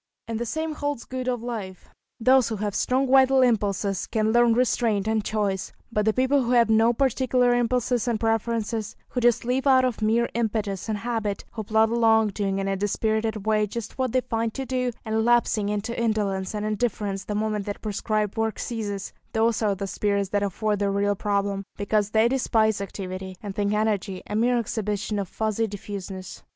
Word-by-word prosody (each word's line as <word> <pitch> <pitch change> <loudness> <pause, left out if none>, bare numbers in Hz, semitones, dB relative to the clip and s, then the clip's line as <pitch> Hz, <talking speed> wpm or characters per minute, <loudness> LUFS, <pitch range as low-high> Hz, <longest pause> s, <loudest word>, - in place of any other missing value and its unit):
And 225 -1 -3
the 240 - -3
same 315 +6 -2
holds 290 -4 -3
good 255 0 -5
of 245 -2 -1
life. 210 -7 -6 0.3
Those 255 +1 +4
who 225 - -2
have 205 -1 -3
strong 260 +5 +1
vital 265 0 +6
impulses 200 -4 0
can 220 -1 0
learn 240 -1 +5
restraint 230 -4 +1
and 220 -1 +1
choice; 200 -3 -2 0.2
but 210 -2 0
the 220 - +4
people 260 +3 +2
who 245 0 0
have 235 -2 +4
no 225 +2 +5
particular 250 0 +2
impulses 245 0 +1
and 230 -3 0
preferences, 225 -1 -1
who 250 - -2
just 240 0 +3
live 260 +3 0
out 260 -1 +6
of 245 -4 -2
mere 230 +2 +2
impetus 215 -3 -2
and 215 - 0
habit, 220 -2 -3
who 220 -2 -5
plod 220 +1 +2
along, 225 -2 +4
doing 195 -1 -2
in 195 0 -1
a 195 - 0
dispirited 215 +1 -1
way 215 -1 +2
just 230 +3 -7
what 260 -2 0
they 255 - +2
find 225 -2 -2
to 270 - -3
do, 250 -1 -1
and 220 0 0
lapsing 230 -3 +2
into 210 +3 -2
indolence 210 -4 -1
and 210 0 -2
indifference 210 -2 -1
the 210 - -3
moment 210 -1 -1
that 205 - -5
prescribed 215 0 -1
work 225 -1 0
ceases, 205 -4 -4 0.2
those 225 0 +2
are 205 -2 +2
the 200 +1 -4
spirits 200 0 -1
that 205 0 0
afford 205 +1 -1
the 200 -1 +1
real 200 +1 +1
problem, 200 -1 -1
because 205 0 0
they 220 +2 +4
despise 220 -5 +1
activity, 190 -1 -6
and 200 -2 -5
think 205 0 0
energy 210 -3 -1
a 210 - -5
mere 240 +3 +3
exhibition 210 -2 -2
of 195 - -3
fussy 220 +3 -1
diffuseness. 195 -2 -7
220 Hz, 190 wpm, -25 LUFS, 205-235 Hz, 0.3 s, vital